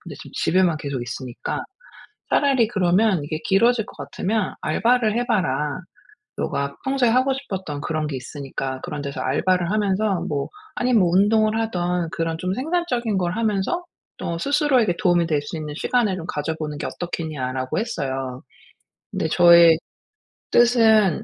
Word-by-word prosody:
근데 - - -9
지금 - - -12
집에만 180 -2 +2
계속 140 -4 -4
있으니까 120 +1 -5 0.7
차라리 265 -6 +3
그러면 190 -3 +2
"이게 155 +1 -4
길어질 225 +3 +3
것 - - -14
같으면 185 +8 -2
알바를 225 +6 +2
해 245 - 0
봐라. 150 - 0 0.6
네가 140 0 -2
평소에 265 -3 +2
하고 260 +3 +3
싶었던 190 - -5
그런 155 -1 -2
게 135 - -4
있으니까 135 0 -5
그런 150 - -5
데서 140 -1 -5
알바를 175 +6 +1
하면서 205 -2 +1
뭐 145 -2 -2 0.3
아님 245 -2 +2
뭐 180 - +4
운동을 215 +3 +3
하든 180 -5 -1
그런 165 -1 -2
좀 180 +2 -2
생산적인 255 - -1
걸 175 -1 0
하면서 225 - 0 0.3
또 170 0 -3
스스로에게 265 - +2
도움이 175 -4 +3
될 150 -2 +1
수 145 - -6
있는 150 -1 -6
시간을 220 -5 +1
좀 165 - -6
가져보는 150 0 -3
게 - - -3
어떻겠냐?"라고 130 -7 -4
했어요. 135 - -3 0.7
근데 - - -1
저의 170 -2 +7 0.7
뜻은 220 -6 +4
180 Hz, 335 characters per minute, -22 LUFS, 150-225 Hz, 0.7 s, 저의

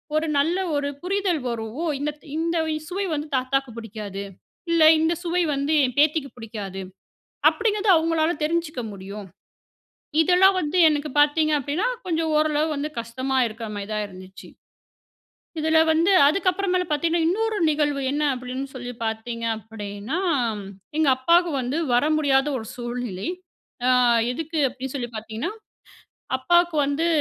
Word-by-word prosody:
ஒரு 315 +1 +1
நல்ல 325 +6 +2 0.2
ஒரு 285 0 0
புரிதல் 370 -4 0
வரும். 225 +3 -5 0.2
இந்த 300 +1 -1
த் - - -18
இந்த 335 +1 0 0.3
சுவை 390 +2 -2
வந்து 295 +1 -4
தாத்தாக்கு 265 0 -1
புடிக்காது. 210 -3 -6 0.5
இல்ல 330 -2 +4 0.2
இந்த 320 +2 +2
சுவை 350 +1 +1
வந்து 280 +3 0
என் 255 +1 -1
பேத்திக்கு 300 -2 +2
புடிக்காது. 205 -4 -6 0.7
அப்டிங்கிறது 425 -2 0
அவங்களால 320 0 +2
தெரிஞ்சிக்க 320 -4 -1
முடியும். 200 +1 -8 1.0
இதெல்லாம் 365 +4 +5
வந்து 305 +4 -2
எனக்கு 300 0 -1
பார்த்தீங்க 305 +1 +3
அப்டின்னா, 290 - -1 0.2
கொஞ்சம் 325 -2 0
ஓரளவு 305 0 +2
வந்து 290 +2 -2
கஷ்டமா 260 +4 -3
இருக்கிற 225 +1 -6
மாதிரி 200 0 -5
தான் 210 -1 -1
இருந்துச்சு. 185 0 -12 1.1
இதுல 320 +1 +3
வந்து 335 +5 +3 0.2
அதுக்கப்புறமேல 365 +1 +1
பார்த்தீங்கன்னா, 325 +2 +1
இன்னொரு 440 +3 0
நிகழ்வு 295 -2 0
என்ன 295 +1 -1
அப்டின்னு 255 +2 -5
சொல்லி 245 -1 -6
பார்த்தீங்க 230 +1 -4
அப்டின்னா, 215 - -6 0.8
எங்க 310 -3 +3
அப்பாக்கு 340 +6 +3
வந்து 255 +6 -2 0.2
வர 245 - +4
முடியாத 275 -2 +3
ஒரு 220 - -7
சூழ்நிலை. 240 - -4 0.6
அ - - +4 0.4
எதுக்கு 320 +3 -4
அப்டின்னு 265 +1 -7
சொல்லி 240 -2 -4
பார்த்தீங்கன்னா, 225 - -4 0.9
அப்பாவுக்கு 345 +4 +3
வந்து 295 +4 0
290 Hz, 135 wpm, -24 LUFS, 240-330 Hz, 1.1 s, இதெல்லாம்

